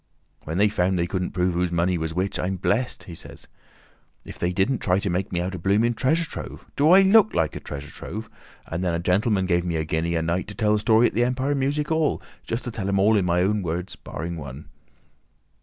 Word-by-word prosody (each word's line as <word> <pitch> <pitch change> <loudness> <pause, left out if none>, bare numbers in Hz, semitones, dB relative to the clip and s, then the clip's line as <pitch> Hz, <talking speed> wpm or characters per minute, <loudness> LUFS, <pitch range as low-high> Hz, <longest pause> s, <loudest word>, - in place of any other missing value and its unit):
"When 80 +3 -3
they 105 +2 +5
found 95 -2 +1
they 85 - +1
couldn't 90 0 -2
prove 90 0 0
whose 90 0 0
money 85 +1 +1
was 80 -1 -2
which, 95 +4 -2
I'm 95 +2 -1
blessed," 110 +7 -1
he 90 - -10
says, - - -11 0.8
"if - - -10
they 90 - 0
didn't 100 +8 +1
try 90 -1 +2
to 100 -1 -1
make 95 +2 -2
me 90 - -1
out 90 +2 -3
a 95 - -5
blooming 105 +7 +2
treasure 155 +8 +1
trove! - - -8
Do 145 +2 +3
I 190 +3 +8
look 215 +2 +5
like 80 -2 +1
a - - -4
Treasure 70 0 -8
Trove? 110 +6 -7 0.4
And 85 +2 -4
then 85 -2 0
a - - -1
gentleman 95 +3 +1
gave 85 -1 +1
me 85 -2 -2
a 80 -1 -1
guinea 80 +2 -1
a 80 - 0
night 85 +3 -1
to 105 - -8
tell 105 -3 +2
the 105 - +2
story 110 +2 +4
at - - +1
the 120 - +2
Empire 130 +3 0
Music 145 +3 -1
'All—just 150 -6 -2
to 120 - -4
tell 100 -3 -3
'em 100 - +1
in 100 0 +3
my 90 0 +2
own 105 +2 +1
words—barring 85 -1 -5
one." 70 -1 -9
95 Hz, 230 wpm, -24 LUFS, 85-115 Hz, 0.8 s, I